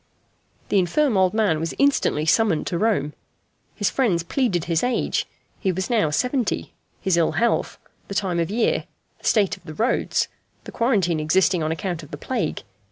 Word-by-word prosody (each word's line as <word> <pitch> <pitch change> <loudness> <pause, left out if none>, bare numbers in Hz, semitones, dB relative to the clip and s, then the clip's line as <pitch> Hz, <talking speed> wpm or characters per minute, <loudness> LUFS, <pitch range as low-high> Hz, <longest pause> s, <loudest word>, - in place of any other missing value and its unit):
The 200 - +3
infirm 230 - +2
old 185 -1 +4
man 205 -8 +2
was 165 +1 -3
instantly 275 - +2
summoned 200 -2 +2
to 175 - -2
Rome. 200 -9 +1 0.6
His 205 - 0
friends 195 -11 +1
pleaded 185 - 0
his 165 -1 +1
age 250 0 0 0.3
he 190 - +1
was 190 +6 -3
now 215 -10 +3
seventy 250 - -1 0.3
his 190 -4 +1
ill 165 - +2
health, 235 0 0 0.3
the 200 - -6
time 185 -4 0
of 165 - 0
year, 225 +3 +1 0.3
the - - -16
state 205 -2 +2
of - - -23
the 155 - -9
roads, 235 +8 +1 0.4
the - - -9
quarantine 195 -9 +1
existing 180 +3 +2
on 155 0 -1
account 175 0 -3
of 150 - -12
the 145 - -7
plague. 220 - -3
190 Hz, 175 wpm, -23 LUFS, 165-225 Hz, 0.6 s, old